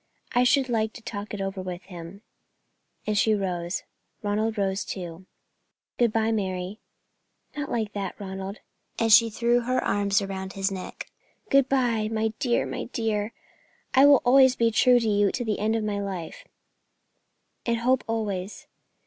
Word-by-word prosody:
"I 245 0 +4
should 265 +1 +3
like 220 -3 0
to 240 - -11
talk 205 -2 -6
it 205 - -4
over 195 0 -3
with 180 -1 -6
him," 180 +2 -10 0.8
and 215 - 0
she 215 +1 +3
rose. 180 -2 -2 0.4
Ronald 215 +2 0
rose 195 0 0
too. 180 -1 -7 0.7
"Good 240 -2 +4
bye, 225 0 +1
Mary." 190 -1 -2 0.8
"Not 290 -1 -4
like 220 -3 -2
that, 200 0 -4
Ronald," 195 0 -6 0.4
and 225 -1 +3
she 230 +1 +7
threw 235 +2 +2
her 255 +2 -1
arms 200 -1 +2
round 190 -1 -5
his 195 0 -1
neck. 190 -1 -7 0.4
"Good 275 -1 +4
bye, 240 -5 +1
my 220 0 +1
dear, 240 -2 +1
my - - -4
dear. 220 -3 -2 0.6
I 270 +2 +7
will 285 -3 +6
always 260 +1 +6
be 230 -1 +2
true 245 +2 +5
to 230 - -1
you 205 -1 +3
to 245 -2 -2
the 215 -2 -1
end 215 +2 +1
of 225 - -1
my 205 -1 -1
life. 190 -5 -6 1.2
And 235 0 +2
hope 255 +2 +2
always. 210 -4 -3
215 Hz, 165 wpm, -26 LUFS, 195-235 Hz, 1.2 s, she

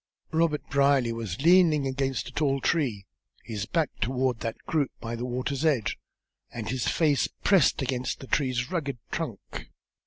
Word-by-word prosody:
Robert 160 -2 +1
Brierly 140 -4 +3
was 115 -3 -5
leaning 165 -4 +5
against 135 -1 -1
a - - -8
tall 140 -3 +1
tree, 125 - 0 0.4
his 105 -2 -4
back 165 -3 0
toward 125 -1 0
that 115 -1 -4
group 150 -4 +1
by 115 0 -4
the 120 +1 -4
water's 130 +3 -2
edge, 145 -9 +1 0.5
and 115 -2 -5
his 125 -1 -1
face 150 -4 +2 0.2
pressed 185 -8 +4
against 130 -1 -2
the - - -9
tree's 130 0 0
rugged 140 -8 -2
trunk. - - -5
135 Hz, 155 wpm, -27 LUFS, 120-150 Hz, 0.5 s, leaning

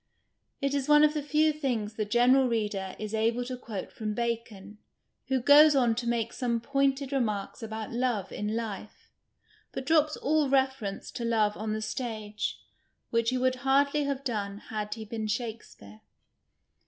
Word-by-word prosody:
It 275 0 0
is 280 0 -1
one 295 0 +7
of 300 0 +4
the 300 - -1
few 305 +2 +2
things 245 -8 -2
the 220 -1 -2
general 250 +5 +4
reader 205 -5 -2
is 215 0 -6
able 230 +3 +1
to 255 +1 -4
quote 220 -6 -7
from 215 -1 -4
Bacon, 220 -3 -4 0.5
who 265 -1 +1
goes 290 +4 +7
on 245 -4 +3
to 240 +1 -4
make 235 -1 -1
some 240 -3 -1
pointed 275 +2 0
remarks 215 -8 -2
about 220 -1 -5
love 235 -5 -1
in 210 +1 -3
life, 215 -2 -6 0.6
but 265 - -5
drops 305 0 +3
all 300 -1 +1
reference 265 -7 0
to 240 - -5
love 220 -3 +2
on 215 0 -3
the 215 0 -3
stage, 215 -2 -4 0.5
which 230 0 +2
he 255 - 0
would 255 0 +1
hardly 280 +3 +2
have 275 -1 -2
done 205 -6 -3 0.2
had 210 0 -3
he 220 -1 -7
been 220 0 -4
Shakespeare. 215 - -6
235 Hz, 165 wpm, -28 LUFS, 215-270 Hz, 0.6 s, one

